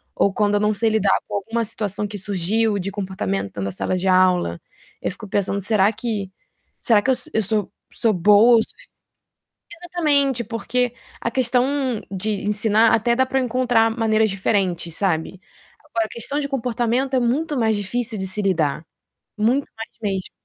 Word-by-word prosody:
ou 200 Hz, -, +2 dB
quando 205 Hz, 0 st, +1 dB
eu -, -, +3 dB
não 210 Hz, 0 st, +2 dB
sei 225 Hz, +2 st, +1 dB
lidar 210 Hz, -3 st, +2 dB
com -, -, -5 dB
alguma 225 Hz, +3 st, -2 dB
situação 210 Hz, -1 st, -3 dB
que 205 Hz, 0 st, -7 dB
surgiu 205 Hz, +3 st, 0 dB
de 195 Hz, +2 st, -3 dB
comportamento 100 Hz, -, -3 dB
na 95 Hz, 0 st, -2 dB
sala 140 Hz, -, -2 dB
de 190 Hz, +1 st, -2 dB
aula, 185 Hz, -, +3 dB, 0.4 s
eu -, -, -2 dB
fico 210 Hz, +3 st, -10 dB
pensando: 200 Hz, 0 st, -1 dB
"Será 205 Hz, 0 st, +3 dB
que 210 Hz, -4 st, -4 dB, 0.5 s
será 215 Hz, -3 st, +3 dB
que 265 Hz, -, -2 dB
eu -, -, +3 dB
sou -, -, -3 dB
eu 220 Hz, -, +2 dB
sou 210 Hz, 0 st, -1 dB, 0.2 s
sou 225 Hz, -3 st, +2 dB
boa 210 Hz, +6 st, +6 dB
o -, -, +1 dB
sufici". -, -, -18 dB, 0.8 s
Exatamente, 290 Hz, -8 st, +1 dB
porque 245 Hz, +2 st, -1 dB, 0.3 s
a 230 Hz, -, -2 dB
questão 250 Hz, -1 st, +2 dB, 0.5 s
de 200 Hz, +1 st, -2 dB
ensinar, 215 Hz, +2 st, +3 dB
até 235 Hz, +2 st, +2 dB
dá 260 Hz, -, +3 dB
pra 265 Hz, +1 st, 0 dB
encontrar 245 Hz, -2 st, +2 dB
maneiras 220 Hz, -1 st, +2 dB
diferentes, 185 Hz, -4 st, -1 dB
sabe, 185 Hz, -1 st, -1 dB, 0.4 s
agora, 230 Hz, -7 st, -2 dB
a -, -, -9 dB
questão 240 Hz, +5 st, -3 dB
de 280 Hz, -, -2 dB
comportamento 250 Hz, 0 st, -1 dB
é -, -, +4 dB
muito 285 Hz, +5 st, 0 dB
mais 220 Hz, -2 st, +2 dB
difícil 220 Hz, +3 st, -3 dB
de 190 Hz, 0 st, -3 dB
se 200 Hz, +3 st, 0 dB
lidar, 165 Hz, -6 st, 0 dB, 0.5 s
muito 245 Hz, +6 st, +1 dB
mais 225 Hz, 0 st, -7 dB
mesmo. 195 Hz, -3 st, -2 dB
215 Hz, 175 wpm, -21 LUFS, 195-235 Hz, 0.8 s, boa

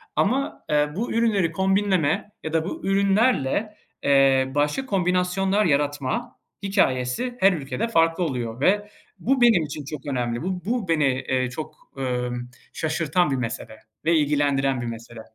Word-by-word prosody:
Ama, 265 Hz, +7 st, 0 dB
eee, 150 Hz, 0 st, +2 dB
bu 230 Hz, +5 st, -2 dB
ürünleri 215 Hz, -7 st, +2 dB
kombinleme 190 Hz, 0 st, +1 dB
ya 160 Hz, -, -5 dB
da 160 Hz, -1 st, +1 dB
bu 190 Hz, -, -6 dB
ürünlerle, 200 Hz, -, +2 dB, 0.3 s
eee, 135 Hz, -1 st, +4 dB
başka 150 Hz, -, 0 dB
kombinasyonlar 190 Hz, 0 st, +1 dB
yaratma 145 Hz, -3 st, -1 dB, 0.3 s
hikâyesi 195 Hz, -, 0 dB
her 195 Hz, 0 st, +5 dB
ülkede 140 Hz, -, -3 dB
farklı 165 Hz, -3 st, +2 dB
oluyor 120 Hz, -5 st, -3 dB
ve 205 Hz, +5 st, +2 dB, 0.3 s
bu 265 Hz, +2 st, +1 dB
benim 225 Hz, -8 st, +5 dB
için 150 Hz, -1 st, -6 dB
çok 150 Hz, -1 st, -7 dB
önemli. 120 Hz, -3 st, -2 dB
Bu 180 Hz, -1 st, -3 dB
bu 230 Hz, -3 st, -1 dB
beni, 160 Hz, -3 st, +2 dB
eee, 130 Hz, -1 st, 0 dB
çok, 150 Hz, +5 st, -7 dB, 0.2 s
ömm, 125 Hz, -2 st, -3 dB, 0.2 s
şaşırtan 160 Hz, +1 st, 0 dB
bir 135 Hz, -, +1 dB
mesele 115 Hz, -3 st, -5 dB, 0.3 s
ve 165 Hz, +1 st, +4 dB
ilgilendiren 140 Hz, -3 st, +1 dB
bir 120 Hz, -, -4 dB
mesele. 115 Hz, 0 st, -8 dB
160 Hz, 145 wpm, -24 LUFS, 135-195 Hz, 0.3 s, her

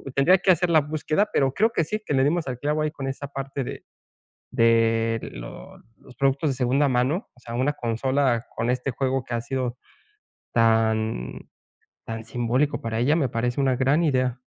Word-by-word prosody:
Tendría 170 Hz, +7 st, +5 dB
que 190 Hz, -, +4 dB
hacer 180 Hz, 0 st, +2 dB
la 160 Hz, -2 st, +5 dB
búsqueda, 155 Hz, +6 st, 0 dB
pero, 135 Hz, -1 st, +2 dB
creo 220 Hz, +8 st, +2 dB
que 170 Hz, -, +2 dB
sí, 215 Hz, +7 st, -3 dB
que -, -, -2 dB
le 130 Hz, -1 st, +3 dB
dimos 160 Hz, +1 st, 0 dB
al 125 Hz, -2 st, -4 dB
clavo, 150 Hz, +2 st, 0 dB
ahí 155 Hz, -, -1 dB
con 135 Hz, -3 st, -6 dB
esa 135 Hz, +1 st, -4 dB
parte 135 Hz, 0 st, -4 dB
de -, -, -7 dB, 0.7 s
de 115 Hz, -1 st, +3 dB
los 115 Hz, -, -12 dB
productos 140 Hz, +2 st, +2 dB
de -, -, -1 dB
segunda 135 Hz, +3 st, +2 dB
mano. 130 Hz, -, 0 dB
O -, -, -21 dB
sea, 115 Hz, -1 st, -8 dB
una 130 Hz, +4 st, +1 dB
consola 120 Hz, 0 st, 0 dB
con 115 Hz, +1 st, -1 dB
este 125 Hz, +2 st, -1 dB
juego 130 Hz, 0 st, -1 dB
que 120 Hz, -, -5 dB
ha 115 Hz, -, 0 dB
sido 125 Hz, 0 st, -3 dB, 0.7 s
tan 110 Hz, -, +1 dB, 0.7 s
tan 115 Hz, 0 st, -5 dB
simbólico 120 Hz, +5 st, 0 dB
para 115 Hz, -1 st, -2 dB
ella, 135 Hz, +6 st, +3 dB
me 145 Hz, -6 st, +1 dB
parece 120 Hz, +3 st, -1 dB
una 135 Hz, -2 st, +2 dB
gran 135 Hz, +5 st, +2 dB
idea. 130 Hz, -4 st, +1 dB
130 Hz, 185 wpm, -24 LUFS, 115-145 Hz, 0.7 s, Tendría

